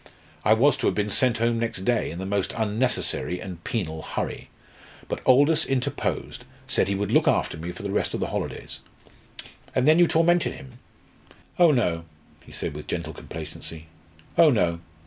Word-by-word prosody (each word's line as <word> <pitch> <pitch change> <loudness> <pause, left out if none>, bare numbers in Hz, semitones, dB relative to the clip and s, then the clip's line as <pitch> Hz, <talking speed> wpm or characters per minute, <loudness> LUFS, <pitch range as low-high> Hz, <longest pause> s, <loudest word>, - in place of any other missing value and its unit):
I 105 - +5
was 135 +5 +4
to 135 - 0
have - - +1
been 105 0 -1
sent 125 -1 +3
home 115 0 +1
next 115 -5 -3
day, 120 -2 +1
in 85 - -7
the 95 - -4
most 100 0 -1
unnecessary 110 -4 0
and 90 -3 -8
penal 80 -8 -3
hurry. - - -4 0.6
But - - -4
Aldous 145 +5 +5
interposed 135 +1 -2 0.2
said - - +1
he 100 - 0
would 100 0 -2
look - - +4
after - - +2
me 85 +3 -5
for 95 - -9
the 100 - -3
rest 100 - 0
of - - -3
the - - -2
holidays." - - -4 1.0
"And 130 +2 +2
then 155 +2 +6
you 175 - +6
tormented 170 +2 +3
him?" 130 -5 -12 0.8
"Oh 175 -2 +7
no!" 90 - +1 0.4
he - - -16
said - - -4
with 75 - -8
gentle 80 -2 -3
complacency. 80 +1 -7 0.5
"Oh 165 - +8
no! 85 - +1
110 Hz, 180 wpm, -25 LUFS, 90-130 Hz, 1.0 s, Oh